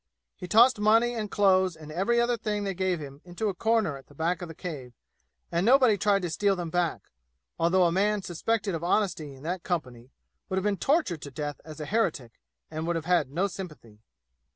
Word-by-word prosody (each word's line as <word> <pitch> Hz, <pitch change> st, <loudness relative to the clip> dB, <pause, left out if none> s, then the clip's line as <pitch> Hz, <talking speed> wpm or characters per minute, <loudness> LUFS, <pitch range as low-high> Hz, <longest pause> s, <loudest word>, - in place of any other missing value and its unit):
He 180 Hz, -, -8 dB
tossed 235 Hz, +5 st, +5 dB
money 225 Hz, +3 st, +4 dB
and 215 Hz, -3 st, -3 dB
clothes 190 Hz, -3 st, +3 dB
and 155 Hz, -1 st, -11 dB
every 195 Hz, +9 st, +1 dB
other 240 Hz, 0 st, +2 dB
thing 210 Hz, -2 st, -2 dB
they 195 Hz, -1 st, -2 dB
gave 185 Hz, -1 st, 0 dB
him 140 Hz, -1 st, -9 dB
into 180 Hz, +5 st, -3 dB
a -, -, -2 dB
corner 220 Hz, -6 st, +1 dB
at 135 Hz, -, -16 dB
the 145 Hz, -, -18 dB
back 170 Hz, +4 st, -1 dB
of 175 Hz, -, -5 dB
the 165 Hz, -, -10 dB
cave, 140 Hz, -9 st, -7 dB, 0.6 s
and 170 Hz, +1 st, +1 dB
nobody 250 Hz, -1 st, +5 dB
tried 200 Hz, -1 st, +1 dB
to 175 Hz, -, -2 dB
steal 200 Hz, +3 st, +2 dB
them 175 Hz, -3 st, -5 dB
back, 175 Hz, -1 st, -1 dB, 0.5 s
although 175 Hz, +3 st, +3 dB
a 170 Hz, -, +3 dB
man 205 Hz, +2 st, +1 dB
suspected 200 Hz, +3 st, -1 dB
of 165 Hz, 0 st, -4 dB
honesty 170 Hz, -6 st, 0 dB
in 135 Hz, -, -15 dB
that 175 Hz, +3 st, -3 dB
company 125 Hz, -9 st, -4 dB, 0.4 s
would 190 Hz, -, -1 dB
have 190 Hz, -, 0 dB
been 205 Hz, -1 st, 0 dB
tortured 270 Hz, -, +1 dB
to 140 Hz, -, -7 dB
death 145 Hz, +1 st, -5 dB
as 155 Hz, -1 st, -10 dB
an 150 Hz, -, -4 dB
heretic 165 Hz, -, -1 dB, 0.3 s
and 160 Hz, +1 st, -4 dB
would 170 Hz, -, 0 dB
have 165 Hz, -1 st, -3 dB
had 175 Hz, -6 st, +2 dB
no 170 Hz, +8 st, 0 dB
sympathy. 155 Hz, -, -8 dB
180 Hz, 215 wpm, -27 LUFS, 155-210 Hz, 0.6 s, tossed